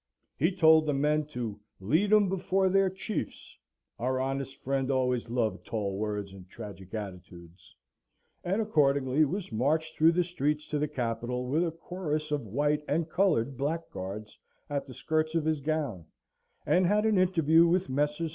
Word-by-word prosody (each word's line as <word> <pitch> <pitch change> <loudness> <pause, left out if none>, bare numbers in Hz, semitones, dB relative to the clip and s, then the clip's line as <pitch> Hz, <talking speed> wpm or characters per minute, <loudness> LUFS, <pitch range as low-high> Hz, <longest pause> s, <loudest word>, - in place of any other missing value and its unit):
He 165 +6 +2
told 160 -4 +5
the 145 - +1
men 150 +2 +1
to 120 -7 -5 0.2
"lead 160 - +1
him 210 -2 +6
before 190 0 +1
their 195 0 +3
chiefs" 190 +3 -5 0.4
(our 130 +2 0
honest 135 0 -3
friend 135 0 -1
always 125 -3 0
loved 115 -5 -1
tall 100 -4 -3
words 105 -1 -3
and 95 -1 -13
tragic 95 -1 -9
attitudes); 90 -4 -9 0.7
and 190 +5 0
accordingly 140 -6 +3
was 180 +3 -4
marched 155 +7 0
through 160 +2 +5
the 180 +1 +2
streets 150 -3 -1
to 150 - -1
the 150 - 0
Capitol, 125 -2 -3
with 150 +7 +1
a 170 - 0
chorus 160 -2 -4
of 145 -6 -2
white 145 +7 0
and 160 +2 -1
coloured 155 - +2
blackguards 110 - -4 0.3
at 140 -1 -2
the 130 - -9
skirts 155 +1 -1
of 165 -2 +1
his 155 -1 +1
gown; 140 - -2 0.6
and 180 0 +3
had 210 +3 +2
an 215 -3 +3
interview 165 -3 +4
with 180 +2 +1
Messrs. 150 +4 -1
150 Hz, 165 wpm, -29 LUFS, 120-165 Hz, 0.7 s, him